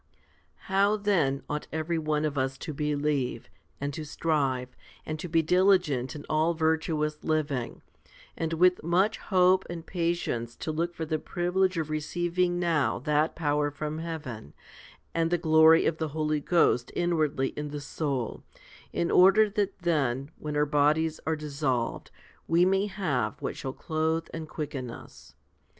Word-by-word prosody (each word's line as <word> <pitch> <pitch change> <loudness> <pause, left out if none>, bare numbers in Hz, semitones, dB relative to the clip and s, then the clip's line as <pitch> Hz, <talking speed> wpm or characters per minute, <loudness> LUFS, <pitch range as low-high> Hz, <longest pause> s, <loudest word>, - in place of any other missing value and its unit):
10. - - -39 0.6
How 200 +2 +4
then 170 -10 +1
ought 150 0 -4
every 160 +2 -1
one 155 -1 0
of 150 -1 -2
us 135 0 -1
to 155 - -6
believe, 145 -4 -1 0.3
and 140 0 -3
to 155 - -5
strive, 140 -5 -1 0.3
and 155 0 -4
to 175 - -5
be 165 0 +3
diligent 180 -7 +2
in 145 - -8
all 160 +2 +1
virtuous 160 -1 0
living, 145 -6 -2 0.5
and 165 0 -2
with 180 +2 +4
much 185 +7 +1
hope 185 -1 +3
and 170 -1 -6
patience 165 -10 -2
to 155 - -4
look 170 +2 -2
for 160 - -3
the 155 0 -1
privilege 185 +2 0
of 160 -2 -2
receiv 170 +3 -3
ing 175 -1 +2
now 165 -5 +1
that 150 +4 +1
power 150 -2 +1
from 150 +2 -5
heaven, 150 - -6 0.6
and 165 0 +1
the 175 - +2
glory 160 -1 +6
of 160 - +1
the 160 - -1
Holy 155 0 -1
Ghost 140 -6 +2
inwardly 155 -6 +1
in 150 0 -5
the 145 0 -5
soul, 140 -5 -3 0.5
in 170 - -1
order 200 +3 +6
that 200 -2 -1
then, 140 -4 0
when 150 -1 -4
our 150 - +3
bodies 150 +2 +2
are 160 - +2
dissolved, 140 -5 -2 0.4
we 170 +2 +4
may 195 +2 +2
have 175 -11 -2
what - - -4
shall 130 - -4
clothe 160 +3 -1
and 160 -1 -6
quicken 140 -6 -5
us 115 - -12
155 Hz, 160 wpm, -28 LUFS, 145-170 Hz, 0.6 s, glory